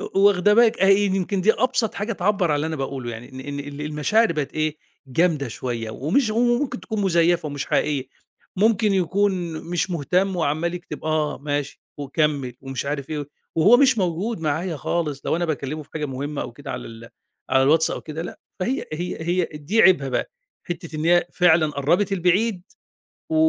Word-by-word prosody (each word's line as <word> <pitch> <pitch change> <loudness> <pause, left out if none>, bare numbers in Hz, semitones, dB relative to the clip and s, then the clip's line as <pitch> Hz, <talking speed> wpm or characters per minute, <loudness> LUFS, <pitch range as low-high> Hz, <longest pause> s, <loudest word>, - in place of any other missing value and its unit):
واخدة 200 +1 +3
بالِك 235 0 +5
أهي 195 +1 +5
يمكن 190 0 0
دي 215 +4 +4
أبسط 255 -3 0
حاجة 215 +3 -2
تعبَّر 195 -1 +1
على 150 - +2
اللي 150 - -1
أنا 160 0 -3
باقول 135 -2 -4
له، 120 - -3
يعني 115 +2 -8
إن 130 - -8
إن 145 +1 -5
ال 145 +1 -8
المشاعر 150 +8 +2
بقت 150 -3 -3
إيه، 155 0 -1 0.3
جامدة 150 -1 +1
شوية، 115 -1 -4
ومش 205 - +1
و 215 - -3
وممكن 245 +1 +1
تكون 220 -2 -4
مزيّفة 170 -3 +2
ومش 145 -1 -4
حقيقية، 145 -3 0 0.5
ممكن 210 0 +3
يكون 185 -1 +1 0.2
مش 175 +2 0
مهتم 180 +4 0
وعمّال 165 +2 0
يكتب 175 -2 -8
آه 155 -1 0
ماشي 145 0 -3 0.2
وكمّل 145 -3 -1
ومش 135 0 -5
عارف 140 0 -3
إيه، 145 -2 -4 0.3
وهو 195 +9 +6
مش 260 -3 +4
موجود 185 +4 -1
معايا 160 +2 -1
خالص 150 -1 -2
لو - - +1
أنا 175 - -1
باكلّمه 155 -1 -3
في - - -22
حاجة 150 -2 -2
مهمّة 140 +2 -4
أو - - -7
كده 140 +3 -9
على - - -5
ال 115 0 -11 0.4
على 130 - +4
الواتس 160 +4 +4
أو - - -4
كده 160 +1 -6
لأ، 175 - -8 0.2
فهي 255 +9 -1
هي 175 +3 -3
هي 175 +2 +1
دي 155 +9 +1
عيبها 175 -8 +5
بقى، 125 - -2 0.4
حتّة 165 -2 -5
إن 155 - -3
هي 175 +1 +4
فعلًا 160 -3 +4
قرّبِت 170 +9 +1
البعيد 185 +2 +1 0.7
و 320 - -1
165 Hz, 190 wpm, -23 LUFS, 145-195 Hz, 0.7 s, وهو